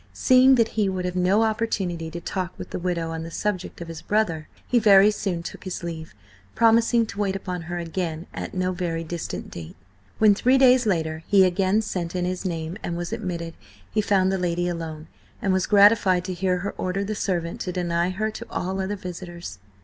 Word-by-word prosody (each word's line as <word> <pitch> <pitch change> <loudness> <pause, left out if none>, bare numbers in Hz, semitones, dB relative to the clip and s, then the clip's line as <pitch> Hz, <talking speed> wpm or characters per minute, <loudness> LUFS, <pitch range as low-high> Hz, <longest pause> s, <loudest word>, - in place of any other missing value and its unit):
Seeing 260 0 +5
that 230 -2 +3
he 210 -3 0
would 185 -1 -3
have 180 0 -3
no 185 +4 +3
opportunity 195 -7 -1
to 170 +1 -6
talk 185 +1 -4
with - - -8
the - - -3
widow 170 -2 -2
on 165 0 -4
the 165 - -6
subject 185 0 -3
of 170 - -6
his 165 -1 -7
brother, 170 -8 0 0.2
he 245 - +3
very 205 -1 +7
soon 185 -5 -3
took - - -8
his 185 -2 -5
leave, 160 -6 -6 0.4
promising 230 0 +4
to 205 -2 -8
wait 195 -2 0
upon 180 -2 -4
her 175 - -3
again 170 -1 -3
at - - -6
no 185 0 0
very 170 -2 -3
distant 170 +1 -5
date. 80 -2 -9 0.4
When, 215 -2 +6
three 250 +6 +3
days 255 -2 +5
later, 160 -4 -1
he 200 -2 +6
again 190 +4 +2
sent 175 -4 -4
in 180 -1 0
his 185 +1 -3
name 165 0 -3
and 170 - -3
was 175 +4 -4
admitted, 175 -7 -4 0.4
he 215 - +1
found 190 -2 +2
the 190 - -1
lady 175 0 0
alone, 165 -2 -5 0.3
and 195 - +1
was 185 0 +1
gratified 200 -3 +5
to 185 - -3
hear 180 0 0
her - - -3
order 185 +2 -1
the 210 +2 -3
servant 175 -5 -2
to 180 - -3
deny 175 -1 0
her 215 +4 -2
to - - -8
all 190 +1 -2
other 195 +2 -2
visitors. 175 - -8
185 Hz, 210 wpm, -24 LUFS, 170-205 Hz, 0.4 s, very